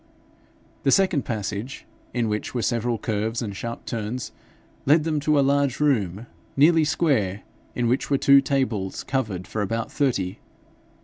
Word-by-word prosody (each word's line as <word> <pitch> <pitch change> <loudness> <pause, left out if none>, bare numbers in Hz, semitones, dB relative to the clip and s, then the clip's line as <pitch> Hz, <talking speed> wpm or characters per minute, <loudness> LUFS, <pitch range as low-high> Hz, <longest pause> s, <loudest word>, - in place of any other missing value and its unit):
The - - +1
second 180 -3 +3
passage, 110 +2 -4 0.3
in 120 -2 0
which 105 +3 -3
were 120 - 0
several 120 -1 0
curves 110 +1 -2
and 105 -5 -4
sharp 115 +3 -6
turns, 115 +2 -4 0.6
led 155 +2 +5
them 155 -1 0
to 150 +1 +2
a 140 - +3
large 140 -2 +1
room, 110 -8 +1 0.3
nearly 160 +2 +5
square, 130 - +1 0.3
in 120 -1 0
which 125 +3 0
were 140 - +3
two 140 0 +6
tables 130 -9 -1
covered 105 -9 -2
for 110 - -3
about 115 +3 -2
thirty. 105 -11 -1
120 Hz, 150 wpm, -24 LUFS, 105-140 Hz, 0.6 s, two